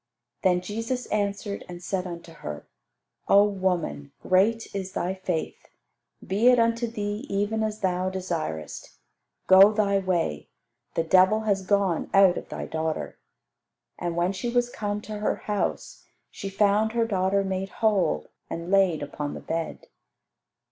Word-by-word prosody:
Then 180 -1 +3
Jesus 230 +6 -3
answered, 200 -1 -2
and 175 0 -8
said 185 0 -2
unto 170 -1 -8
her, 75 - -8 0.6
"O 200 +1 +7
woman, 180 - -1
great 210 +5 +3
is 190 -1 -4
thy 175 +2 -1
faith; 185 -4 -4 0.6
be 205 +6 +2
it 250 0 +7
unto 230 0 +2
thee 210 +2 -4
even 205 +3 0
as 215 -1 -2
thou 185 -1 0
desirest. 165 - -5 0.5
Go 190 +2 +8
thy 200 -2 +2
way; 175 - -1 0.5
the 165 - +2
devil 185 +5 +4
has 200 -3 +1
gone 195 -3 +1
out 195 -2 +6
of - - -7
thy - - -5
daughter." 160 0 -3 0.8
And 175 -1 -2
when 175 +3 +1
she 200 +5 -3
was 245 0 +1
come 205 0 -3
to 210 0 -6
her 210 - 0
house 210 -1 -3 0.3
she 195 - -6
found 210 +2 +2
her 230 -1 +2
daughter 195 -2 +1
made 190 0 -3
whole 195 - +1 0.2
and 170 +2 -5
laid 190 -6 +3
upon 145 0 -5
the - - -6
bed. 165 0 -4
195 Hz, 150 wpm, -26 LUFS, 180-210 Hz, 0.8 s, Go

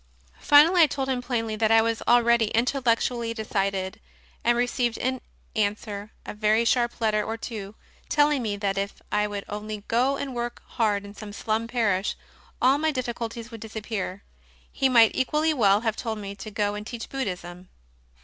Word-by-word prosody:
Finally 325 +5 +6
I 320 - +7
told 270 -2 -3
him 255 -2 0
plainly 230 -3 -2
that 220 0 +1
I 225 0 +6
was 230 -1 -1
already 235 -1 +4
intellectually 235 0 0
decided, 195 -3 -2 0.4
and 240 0 +3
received 245 -1 0
in 260 0 -2 0.3
answer 205 -1 -2 0.2
a - - -6
very 215 +2 +2
sharp 240 0 +1
letter 215 -2 +1
or 225 +1 -4
two, 215 -3 -7 0.3
telling 295 -3 +3
me 210 -3 -2
that 200 -1 -1
if 200 +1 -4
I 210 0 +2
would 205 -1 -5
only 210 0 -6
go 255 +4 +2
and 275 -2 -4
work 240 0 -4
hard 205 -3 0
in 200 - -10
some 210 -1 -9
slum 220 +2 -1
parish 210 -5 0 0.4
all 265 +3 +4
my 315 +1 +2
difficulties 235 -3 -4
would 225 -2 -9
disappear. 215 -3 -5 0.5
He 270 -1 +1
might 230 -3 +6
equally 305 +4 +1
well 205 -6 +4
have 220 -2 0
told 225 -2 -3
me 200 -1 -6
to 200 +2 -8
go 205 -1 -1
and 210 +1 -6
teach 235 -2 -6
Buddhism. 180 -8 -5
225 Hz, 175 wpm, -26 LUFS, 210-245 Hz, 0.5 s, I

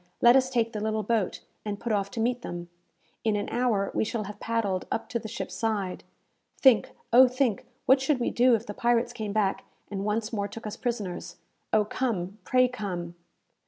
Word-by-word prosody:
"Let 240 +1 +7
us 260 -1 +4
take 235 -3 0
the 215 - -3
little 215 0 -1
boat, 215 -2 0 0.2
and 205 -1 -4
put 235 - -3
off 200 -2 +1
to 230 - -6
meet 245 +2 +1
them. 175 -3 -6 0.5
In 220 -2 +2
an 205 0 -1
hour 230 -5 +1
we - - +1
shall 220 0 -2
have 205 +1 -8
paddled 210 -5 -1
up 225 - -2
to 235 - -1
the 220 - -7
ship's 230 - -5
side. 205 -5 -2 0.5
Think, 260 -5 +5 0.2
Oh 255 +2 +9
think! 250 -5 0 0.2
what 265 +1 +5
should 270 0 +1
we 240 - 0
do 245 0 +5
if 225 +1 -4
the 205 - -6
pirates 240 +2 +1
came 215 -4 -4
back, 200 -2 +1 0.3
and 195 -1 -3
once 215 +2 -1
more 200 -2 -1
took 225 +3 -9
us 210 - -4
prisoners? 190 -7 -4 0.4
Oh 215 -1 +4
come, 205 -4 -2
pray 255 -1 +4
come!" 185 -8 -4
220 Hz, 200 wpm, -28 LUFS, 205-240 Hz, 0.5 s, Oh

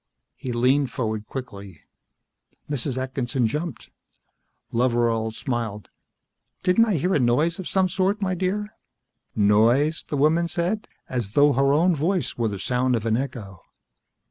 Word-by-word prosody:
He 130 - -5
leaned 130 +3 +2
forward 110 -4 -3
quickly. 100 - -8 0.9
Mrs. 140 -2 -2
Atkinson 130 -1 -1
jumped. 150 +5 -4 0.8
Loveral 115 -2 +1
smiled. 110 -3 -4 0.7
"Didn't 185 +5 +4
I 215 -4 0
hear 180 +5 0
a - - +3
noise 145 +8 +2
of 185 - -5
some 190 -1 +2
sort, 190 +3 0
my 190 -2 -1
dear?" 200 +4 -2 0.6
"Noise?" 115 +9 +3
the 145 - -1
woman 160 +4 +3
said, 175 +6 -2 0.2
as 120 -5 -3
though 145 0 +5
her 135 +1 +3
own 170 +5 +4
voice 170 +4 -1
were 115 -1 0
the 100 -2 -3
sound 125 +4 0
of 115 -1 -3
an 110 -1 +2
echo. 115 -8 -5
130 Hz, 145 wpm, -24 LUFS, 115-170 Hz, 0.9 s, though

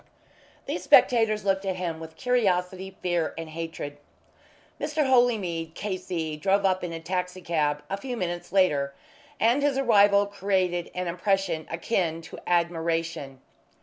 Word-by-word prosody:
These - - -3
spectators 220 -4 +4
looked 195 0 +1
at 190 -1 -1
him 170 -3 -3
with 160 0 -9
curiosity, 190 -6 0
fear, 175 -3 0
and 165 -1 -6
hatred. 160 -3 -6 0.8
Mr. 300 -1 0
Holymead, 205 -11 +2
K.C., 180 -6 -3
drove 195 +5 +2
up 185 -1 +2
in 175 - -3
a 165 - -5
taxi 180 +2 -3
cab 150 -4 0
a 195 - -3
few 245 +3 -5
minutes 175 -3 -4
later, 145 -8 +2 0.4
and 235 +5 +3
his 285 -2 +1
arrival 205 -6 +5
created 185 -3 -1
an 180 0 -2
impression 180 -2 0
akin 165 -1 -1
to - - -10
admiration. 165 -5 -1
180 Hz, 140 wpm, -26 LUFS, 165-200 Hz, 0.8 s, arrival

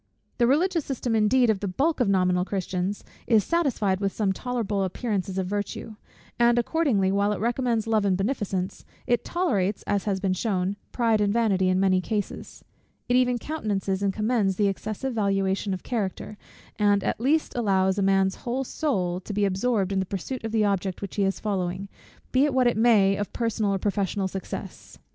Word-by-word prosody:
The 235 - +4
religious 330 +5 +2
system 250 -4 -2
indeed 225 +2 +4
of 205 - -2
the 200 - -3
bulk 280 - 0
of 240 -5 +2
nominal 180 -2 +2
Christians 190 0 -3 0.2
is 220 -3 +4
satisfied 250 - +1
with 200 -1 0
some 200 -2 0
tolerable 220 -3 -2
appearances 190 -1 -2
of 190 - 0
virtue: 205 +2 -4 0.4
and 240 0 +4
accordingly, 240 - +2
while 200 +1 +2
it - - -4
recommends 235 -1 0
love 220 -2 +2
and 190 -2 +2
beneficence, 195 -3 -2 0.2
it 240 -2 +1
tolerates, 210 - 0
as 200 -1 0
has 195 -2 0
been 190 -1 0
shewn, 190 -1 -1 0.2
pride 225 -3 +2
and 205 -1 +2
vanity 200 -5 +2
in 185 0 +2
many 190 -1 +3
cases; 210 +1 -4 0.4
it 245 - +2
even 250 -1 +3
countenances 205 -9 -2
and 200 -1 +1
commends 215 -2 +1
the 205 +1 +2
excessive 215 +6 -3
valuation 195 -2 0
of 185 - -4
character; 215 -2 -3 0.4
and 205 -1 +3
at - - -2
least 300 +5 +1
allows 190 -4 +2
a - - +1
man's 195 0 +2
whole 250 +2 -2
soul 190 - -1
to 200 +3 -7
be 205 0 +1
absorbed 195 0 0
in 195 - +1
the 190 - 0
pursuit 210 +7 -5
of 225 - -3
the 220 -1 +2
object 195 -1 -1
which 200 - -6
he 200 - +2
is 195 0 0
following, 190 -2 -2 0.4
be 260 +1 +4
it 285 -3 -1
what 255 -1 +4
it 240 - +3
may 215 -4 +4
of 205 - -3
personal 225 -3 0
or - - 0
professional 195 0 -1
success. 190 0 -7
205 Hz, 190 wpm, -25 LUFS, 195-235 Hz, 0.4 s, The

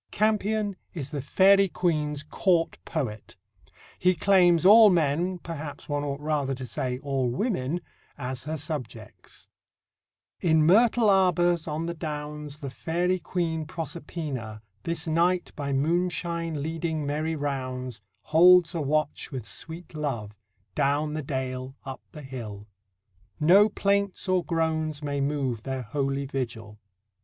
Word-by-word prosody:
Campion 215 -1 +1 0.2
is 145 -4 -5
the 145 -3 -3
Fairy 195 +7 +5
Queen's 150 -4 -1
court 165 +2 +1
poet. 110 -11 -4 0.6
He 185 0 +3
claims 180 -1 +4
all 215 +2 +9
men 175 +1 +1
perhaps, 160 -4 -7
one 145 -1 -1
ought 140 -1 -3
rather 145 -3 -1
to 130 0 -6
say 125 +1 -3
all 135 -2 -1
women 165 - -1 0.4
as 130 -1 -5
her 155 +1 -3
subjects: 130 -8 -7 0.9
In 160 -3 +3
myrtle 225 +5 +5
arbours 175 -4 +3
on 155 +2 -2
the 170 - -3
downs 150 -2 -5
The 140 -2 -5
Fairy 175 +6 -1
Queen 165 -1 -2
Proserpina, 145 -9 -5 0.2
This 165 - -3
night 175 +2 +1
by 140 -2 -3
moonshine 170 +1 -1
leading 160 -1 -2
merry 155 +3 -1
rounds, 130 -5 -4 0.2
Holds 175 +2 +6
a 165 - -2
watch 150 +1 -1
with 130 -3 -5
sweet 165 +2 -5
love, 135 -9 -3 0.4
Down 145 +5 +1
the 155 - -2
dale, 130 -1 -4
up 135 -1 -6
the 150 - -10
hill; 110 -6 -7 0.7
No 195 +7 +6
plaints 200 -1 0
or 185 -1 +2
groans 160 -2 -1
may 140 -1 -1
move 135 -5 -1
Their 130 +1 -4
holy 135 +4 -2
vigil. 115 -6 -5
155 Hz, 130 wpm, -27 LUFS, 135-175 Hz, 0.9 s, all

